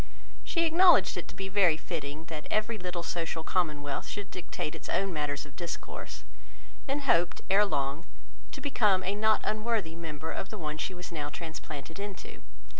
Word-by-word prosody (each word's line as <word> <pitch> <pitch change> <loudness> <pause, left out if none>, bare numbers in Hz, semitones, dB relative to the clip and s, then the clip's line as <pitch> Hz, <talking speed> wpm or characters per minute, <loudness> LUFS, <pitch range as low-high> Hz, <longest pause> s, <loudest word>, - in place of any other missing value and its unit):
She 335 -1 +2
acknowledged 350 +3 +7
it - - -4
to - - -9
be 195 - -3
very 185 -5 +5
fitting, 155 -2 -4
that 155 -2 -6
every 215 +1 +1
little 180 -1 -3
social 165 -1 -2
commonwealth 150 -6 0
should 205 -1 -5
dictate 170 -3 -4
its - - -8
own 195 -1 +1
matters 145 -2 -1
of 140 -3 -14
discourse; 115 -9 -5 0.6
and 280 +2 0
hoped, 175 -11 +3
ere 205 +2 +7
long, 140 -4 -1 0.5
to - - -7
become 210 -9 +3
a 190 +2 +1
not 215 +1 +3
unworthy 215 -6 0
member 160 -2 -4
of 190 - -4
the 215 - -6
one 155 -3 -3
she 185 - -2
was 180 0 -7
now 150 -3 -2
transplanted 160 0 -6
into. 200 -2 -7
175 Hz, 175 wpm, -31 LUFS, 155-205 Hz, 0.6 s, acknowledged